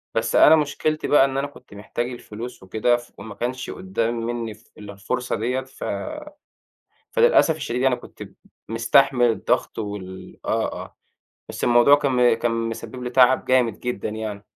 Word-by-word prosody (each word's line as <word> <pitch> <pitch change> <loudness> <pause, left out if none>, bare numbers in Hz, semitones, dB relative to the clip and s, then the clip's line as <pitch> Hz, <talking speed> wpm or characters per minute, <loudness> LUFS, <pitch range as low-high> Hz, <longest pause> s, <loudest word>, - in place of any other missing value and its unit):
بس 115 0 0
أنا - - +8
مشكلتي 155 0 -1
بقى 145 -2 +5
إن 135 0 -3
أنا 140 +1 -1
كنت 145 - -17
محتاج 120 +4 -4
الفلوس 120 -2 -9
وكده، 110 +5 +1
فما 110 -3 -11
كانش 125 +4 -4
قُدَّام 150 -12 -2
مِنِي 115 -2 -3
ف 110 +3 -23
إلا 105 -1 -9
الفرصة 125 +6 -3
ديَّة، 125 +4 -1
ف 130 0 -12 1.3
فللأسف 470 - +4
الشديد 125 -5 -3
يعني، 130 -2 +3
كنت - - -13 0.5
مستحمل 120 +3 +3
الضغط 115 - -1
وال 100 -3 -7
آه - - -1
آه، - - -9 0.5
بس - - -4
الموضوع 120 +4 +6
كان 125 -4 +3
كان 120 +1 -1
مسبِّب 115 +2 -4
لي 125 - -4
تعب 130 0 +4
جامد 125 -5 +1
جدًا 125 -3 -3
يعني. 105 -2 -6
120 Hz, 155 wpm, -23 LUFS, 110-130 Hz, 1.3 s, أنا